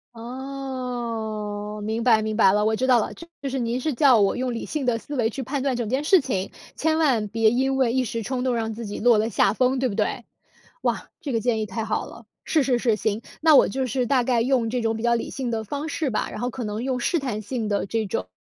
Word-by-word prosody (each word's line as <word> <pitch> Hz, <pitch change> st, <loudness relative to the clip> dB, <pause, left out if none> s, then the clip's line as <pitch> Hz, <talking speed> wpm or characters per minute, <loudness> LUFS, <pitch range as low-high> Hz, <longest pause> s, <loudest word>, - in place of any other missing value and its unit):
哦， 235 Hz, -5 st, -5 dB
明 220 Hz, +2 st, -2 dB
白 230 Hz, -2 st, +4 dB
明 215 Hz, 0 st, -2 dB
白 195 Hz, -4 st, +6 dB
了。 210 Hz, 0 st, +2 dB
我 220 Hz, +1 st, +2 dB
知 255 Hz, +4 st, 0 dB
道 245 Hz, -2 st, +6 dB
了， -, -, -4 dB
就 335 Hz, -5 st, -8 dB
是 265 Hz, -, -2 dB
您 240 Hz, +1 st, -1 dB
是 305 Hz, +3 st, -1 dB
叫 260 Hz, -1 st, +5 dB
我 200 Hz, -, +2 dB
用 255 Hz, -1 st, -1 dB
理 230 Hz, -, -4 dB
性 300 Hz, -4 st, -3 dB
的 240 Hz, -2 st, +2 dB
思 285 Hz, -, -9 dB
维 225 Hz, -2 st, +2 dB
去 265 Hz, +4 st, -5 dB
判 270 Hz, +2 st, -3 dB
断 270 Hz, -2 st, 0 dB
整 235 Hz, -3 st, -2 dB
件 265 Hz, +5 st, 0 dB
事 370 Hz, +2 st, +6 dB
情， 195 Hz, -8 st, -2 dB, 0.3 s
千 315 Hz, 0 st, +1 dB
万 260 Hz, -10 st, +2 dB
别 225 Hz, +1 st, +3 dB
因 265 Hz, +3 st, +1 dB
为 260 Hz, -3 st, +2 dB
一 255 Hz, +1 st, +1 dB
时 230 Hz, 0 st, -3 dB
冲 255 Hz, +3 st, -2 dB
动 250 Hz, -2 st, +1 dB
让 225 Hz, -1 st, -1 dB
自 230 Hz, +1 st, -6 dB
己 205 Hz, -, -5 dB
落 235 Hz, 0 st, +5 dB
了 220 Hz, +2 st, +1 dB
下 195 Hz, -, +3 dB
风， 255 Hz, +4 st, +1 dB
对 260 Hz, 0 st, +1 dB
不 200 Hz, -, -4 dB
对？ 220 Hz, +3 st, -1 dB, 0.6 s
哇， -, -, -1 dB
这 280 Hz, -, -4 dB
个 225 Hz, -, +1 dB
建 230 Hz, -1 st, +1 dB
议 215 Hz, -, -1 dB
太 225 Hz, +2 st, -4 dB
好 215 Hz, -1 st, -1 dB
了， 230 Hz, 0 st, -12 dB, 0.2 s
是 310 Hz, -3 st, +2 dB
是 255 Hz, -2 st, +1 dB
是， 230 Hz, -3 st, +2 dB
行。 215 Hz, +1 st, -1 dB, 0.2 s
那 310 Hz, -2 st, +7 dB
我 -, -, +6 dB
就 260 Hz, +4 st, -2 dB
是 250 Hz, +1 st, 0 dB
大 255 Hz, -1 st, +3 dB
概 245 Hz, -1 st, +2 dB
用 240 Hz, -1 st, +1 dB
这 245 Hz, +1 st, -1 dB
种 225 Hz, 0 st, 0 dB
比 220 Hz, -, -5 dB
较 235 Hz, 0 st, +3 dB
理 230 Hz, -, -3 dB
性 260 Hz, -3 st, -3 dB
的 220 Hz, -1 st, -2 dB
方 285 Hz, +8 st, -4 dB
式 310 Hz, -3 st, -1 dB
吧， 220 Hz, -, -1 dB
然 -, -, -6 dB
后 245 Hz, +2 st, -1 dB
可 255 Hz, -, -5 dB
能 210 Hz, 0 st, -3 dB
用 255 Hz, -1 st, -2 dB
试 340 Hz, -, +1 dB
探 245 Hz, -7 st, -3 dB
性 220 Hz, +1 st, -3 dB
的 205 Hz, -1 st, 0 dB
这 220 Hz, +2 st, -1 dB
种， 95 Hz, -, -3 dB
240 Hz, 285 characters per minute, -24 LUFS, 220-265 Hz, 0.6 s, 那